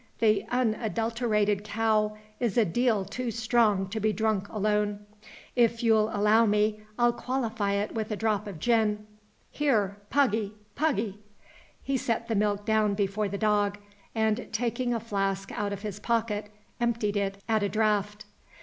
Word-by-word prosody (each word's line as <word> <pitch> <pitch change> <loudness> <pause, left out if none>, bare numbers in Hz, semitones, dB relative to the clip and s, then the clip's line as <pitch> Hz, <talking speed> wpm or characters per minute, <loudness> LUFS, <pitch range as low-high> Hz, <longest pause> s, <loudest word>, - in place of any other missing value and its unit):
The 215 -3 +2
unadulterated 225 -3 0
cow 215 0 +1 0.2
is 240 -2 -1
a 230 - +5
deal 220 +1 +1
too 250 +3 -4
strong 225 -4 +2
to 220 +2 -3
be 215 +1 +2
drunk 215 -2 0
alone. 210 -1 0 0.5
If 235 -1 +2
you'll 220 -2 +4
allow 215 +2 +4
me 210 +1 +1 0.2
I'll 240 0 +4
qualify 230 -5 -1
it 200 +1 -1
with 220 -1 -3
a 215 - -1
drop 210 -1 0
of 195 -5 -6
gin. 210 +1 +1 0.5
Here, 215 -9 +1
Puggy, 220 -7 +1 0.2
Puggy!" 225 -10 -1 0.6
He 275 -1 0
set 230 -1 -1
the 230 - -1
milk 205 0 0
down 215 -2 +2
before 200 +1 0
the 200 - -3
dog; 205 -1 +1 0.4
and, 220 +1 0
taking 240 +2 -1
a 235 - 0
flask 195 -3 -2
out 205 -1 -2
of 200 0 -5
his 210 -1 -5
pocket, 215 -2 -1 0.3
emptied 230 -3 0
it 195 -1 -1
at 220 -2 +2
a 200 - 0
draught. 210 0 0
215 Hz, 155 wpm, -28 LUFS, 205-230 Hz, 0.6 s, a